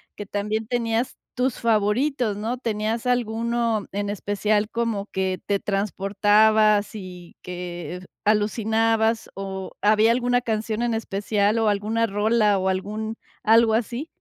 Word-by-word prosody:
que 205 Hz, -, -7 dB
también 210 Hz, +2 st, -2 dB
tenías 235 Hz, 0 st, -1 dB, 0.2 s
tus 255 Hz, -1 st, 0 dB
favoritos, 230 Hz, +2 st, +1 dB
¿no? 225 Hz, +5 st, -3 dB
¿Tenías 225 Hz, -1 st, -2 dB
alguno 235 Hz, -2 st, 0 dB
en 205 Hz, +1 st, -2 dB
especial, 205 Hz, +1 st, 0 dB
como 230 Hz, -4 st, -1 dB
que 190 Hz, -1 st, -1 dB
te 200 Hz, -1 st, 0 dB
transportabas 205 Hz, +1 st, +2 dB
y 180 Hz, -4 st, -9 dB
que 175 Hz, -1 st, -6 dB, 0.2 s
alucinabas, 220 Hz, +1 st, +1 dB
o 190 Hz, -1 st, -5 dB
había 215 Hz, +2 st, +5 dB
alguna 245 Hz, +1 st, +2 dB
canción 220 Hz, -1 st, -2 dB
en 235 Hz, -1 st, 0 dB
especial 210 Hz, 0 st, 0 dB
o 220 Hz, -, +3 dB
alguna 215 Hz, +3 st, 0 dB
rola 210 Hz, 0 st, +2 dB
o 190 Hz, 0 st, 0 dB
algún 215 Hz, +4 st, -3 dB, 0.3 s
algo 225 Hz, 0 st, +5 dB
así? 240 Hz, +6 st, -2 dB
215 Hz, 125 wpm, -24 LUFS, 205-230 Hz, 0.3 s, había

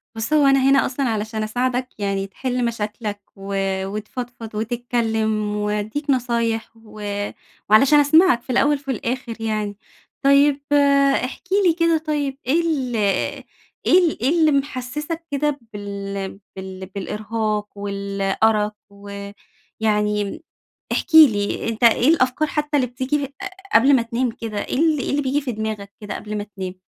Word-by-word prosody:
بُص 225 Hz, +7 st, -2 dB
هو 300 Hz, -2 st, +5 dB
أنا 275 Hz, 0 st, +5 dB
هنا 275 Hz, 0 st, +4 dB
أصلًا 260 Hz, 0 st, -1 dB
علشان 220 Hz, 0 st, -2 dB
أساعدك 250 Hz, +3 st, -1 dB
يعني 195 Hz, -1 st, -1 dB
تحل 250 Hz, +5 st, -2 dB
مشاكلك، 210 Hz, -2 st, -4 dB
و 195 Hz, 0 st, -6 dB, 0.3 s
وتفضفض 220 Hz, +2 st, -6 dB
وتتكلّم 220 Hz, -2 st, -1 dB
وادّيك 210 Hz, +8 st, -2 dB
نصايح، 235 Hz, -3 st, 0 dB
وعلشان 215 Hz, +4 st, +1 dB
أسمعك 290 Hz, -2 st, +5 dB
في -, -, -27 dB
الأوّل 285 Hz, +4 st, +3 dB
في 275 Hz, -1 st, -5 dB
الآخر 235 Hz, -1 st, -4 dB
يعني، 215 Hz, -2 st, -2 dB, 0.4 s
طيّب 280 Hz, +1 st, +4 dB, 0.6 s
احكِ 255 Hz, -, -5 dB, 0.2 s
لي 340 Hz, -, +5 dB
كده 335 Hz, -1 st, +2 dB
طيّب 295 Hz, -3 st, -2 dB
إيه 325 Hz, +6 st, +3 dB
ال 275 Hz, -7 st, -1 dB, 0.9 s
إيه 365 Hz, -, +6 dB
ال 315 Hz, -, -3 dB
إيه 255 Hz, -, +2 dB
اللي 315 Hz, -2 st, +5 dB
محسّسك 290 Hz, +4 st, -3 dB
كده 290 Hz, 0 st, 0 dB
بال 200 Hz, -1 st, -5 dB, 0.2 s
بال 190 Hz, 0 st, -7 dB
بالإرهاق 210 Hz, +2 st, -3 dB
والأرق، 200 Hz, +1 st, 0 dB, 0.2 s
ويعني 205 Hz, +2 st, -4 dB, 0.5 s
احكِ 345 Hz, -, -2 dB
لي 225 Hz, -11 st, +5 dB
أنت 230 Hz, +1 st, -1 dB
إيه 235 Hz, +3 st, +5 dB
الأفكار 310 Hz, -1 st, +2 dB
حتّى 295 Hz, 0 st, -1 dB
اللي 260 Hz, -3 st, +2 dB
بتيجي 260 Hz, +4 st, -2 dB
ق -, -, -18 dB, 0.4 s
قبل 265 Hz, +5 st, +6 dB
ما 240 Hz, -, +2 dB
تنام 235 Hz, +2 st, -1 dB
كده، 225 Hz, -2 st, -6 dB
إيه -, -, -3 dB
ال 315 Hz, -1 st, +3 dB
إيه -, -, -2 dB
اللي 290 Hz, +1 st, +1 dB
بييجي 275 Hz, +2 st, 0 dB
في 265 Hz, -4 st, -4 dB
دماغك 215 Hz, -2 st, -4 dB
كده 210 Hz, -, -6 dB
قبل 215 Hz, 0 st, -5 dB
ما 205 Hz, -, -3 dB
تنام؟ 185 Hz, -1 st, -4 dB
230 Hz, 145 wpm, -21 LUFS, 210-275 Hz, 0.9 s, إيه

